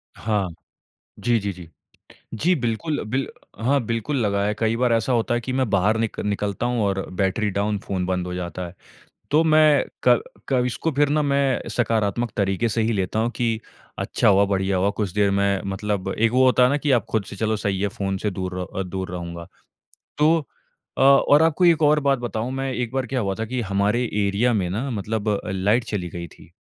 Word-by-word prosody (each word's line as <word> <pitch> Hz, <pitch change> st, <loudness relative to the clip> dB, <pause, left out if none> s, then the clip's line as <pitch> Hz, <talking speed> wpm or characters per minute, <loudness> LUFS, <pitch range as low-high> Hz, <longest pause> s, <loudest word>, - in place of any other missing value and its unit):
हाँ। 105 Hz, -3 st, -1 dB, 0.7 s
जी, 120 Hz, -1 st, +2 dB
जी, 100 Hz, 0 st, -3 dB
जी। 90 Hz, -3 st, -11 dB, 0.7 s
जी 170 Hz, +12 st, +2 dB
बिल्कुल 120 Hz, +7 st, -2 dB
बिल 135 Hz, +3 st, 0 dB, 0.4 s
हाँ 140 Hz, +3 st, +3 dB
बिल्कुल 115 Hz, +6 st, -2 dB
लगा 100 Hz, -2 st, +1 dB
है 105 Hz, +1 st, 0 dB
कई 115 Hz, 0 st, +1 dB
बार 125 Hz, 0 st, +2 dB
ऐसा 115 Hz, +3 st, +1 dB
होता 120 Hz, 0 st, +1 dB
है 120 Hz, -, 0 dB
कि 130 Hz, +2 st, -4 dB
मैं 130 Hz, -2 st, 0 dB
बाहर 100 Hz, +2 st, +2 dB
निक 115 Hz, -1 st, -2 dB
निकलता 105 Hz, +2 st, -2 dB
हूँ 120 Hz, -2 st, 0 dB
और 95 Hz, -1 st, -1 dB, 0.2 s
बैटरी 100 Hz, +2 st, +1 dB
डाउन 100 Hz, +2 st, -1 dB
फ़ोन 95 Hz, -2 st, -3 dB
बंद 90 Hz, -1 st, -1 dB
हो 90 Hz, -, -4 dB
जाता 90 Hz, 0 st, -5 dB
है। 85 Hz, -, -11 dB, 0.6 s
तो 155 Hz, +3 st, +4 dB
मैं 155 Hz, -3 st, +5 dB, 0.2 s
क 120 Hz, -1 st, +6 dB, 0.3 s
क 125 Hz, -2 st, +3 dB
इसको 125 Hz, +6 st, -2 dB
फिर 145 Hz, 0 st, +2 dB
ना 150 Hz, +1 st, +2 dB
मैं 140 Hz, -4 st, 0 dB
सकारात्मक 115 Hz, 0 st, 0 dB
तरीके 100 Hz, +3 st, +1 dB
से 115 Hz, +1 st, 0 dB
ही 115 Hz, +1 st, +1 dB
लेता 95 Hz, +1 st, -1 dB
हूँ 115 Hz, +1 st, +1 dB
कि 115 Hz, -2 st, 0 dB, 0.4 s
अच्छा -, -, 0 dB
हुआ, 100 Hz, 0 st, +5 dB
बढ़िया 95 Hz, -1 st, 0 dB
हुआ, 95 Hz, +2 st, +2 dB
कुछ 100 Hz, -2 st, -3 dB
देर 100 Hz, -1 st, +2 dB
में 100 Hz, 0 st, +1 dB
मतलब 100 Hz, 0 st, -2 dB
एक 115 Hz, +1 st, +3 dB
वो 130 Hz, +1 st, +4 dB
होता 130 Hz, 0 st, +5 dB
है 125 Hz, -, +5 dB
ना 140 Hz, -, +1 dB
कि 145 Hz, 0 st, 0 dB
आप 120 Hz, -3 st, +3 dB
खुद 110 Hz, -2 st, 0 dB
से 100 Hz, -, -9 dB
चलो 110 Hz, +2 st, 0 dB
सही 100 Hz, -2 st, -2 dB
है 100 Hz, -, +2 dB
फ़ोन 95 Hz, -1 st, -3 dB
से 105 Hz, +2 st, -2 dB
दूर 95 Hz, 0 st, -4 dB
र -, -, -2 dB, 0.2 s
अ, -, -, 0 dB
दूर 95 Hz, 0 st, -5 dB
रहूँगा। 85 Hz, -1 st, -6 dB, 0.7 s
तो 155 Hz, +3 st, +4 dB, 0.6 s
अ, -, -, 0 dB
और 140 Hz, +2 st, +6 dB
आपको 165 Hz, +2 st, +3 dB
एक 165 Hz, -2 st, +4 dB
और 150 Hz, +1 st, +5 dB
बात 140 Hz, -2 st, +1 dB
बताऊँ 120 Hz, 0 st, -3 dB
मैं 135 Hz, 0 st, -2 dB
एक 125 Hz, -2 st, -3 dB
बार 135 Hz, -1 st, 0 dB
क्या 130 Hz, +2 st, -1 dB
हुआ 100 Hz, -4 st, -1 dB
था 110 Hz, -, -1 dB
कि 125 Hz, +2 st, -3 dB
हमारे 100 Hz, +3 st, +1 dB, 0.2 s
एरिया 105 Hz, +5 st, +1 dB
में 95 Hz, -5 st, 0 dB
ना 115 Hz, +9 st, -2 dB
मतलब 105 Hz, -2 st, -1 dB
लाइट 100 Hz, +6 st, +1 dB
चली 95 Hz, -6 st, -3 dB
गई 85 Hz, 0 st, -6 dB
थी। 80 Hz, -, -17 dB
110 Hz, 215 wpm, -23 LUFS, 100-125 Hz, 0.7 s, क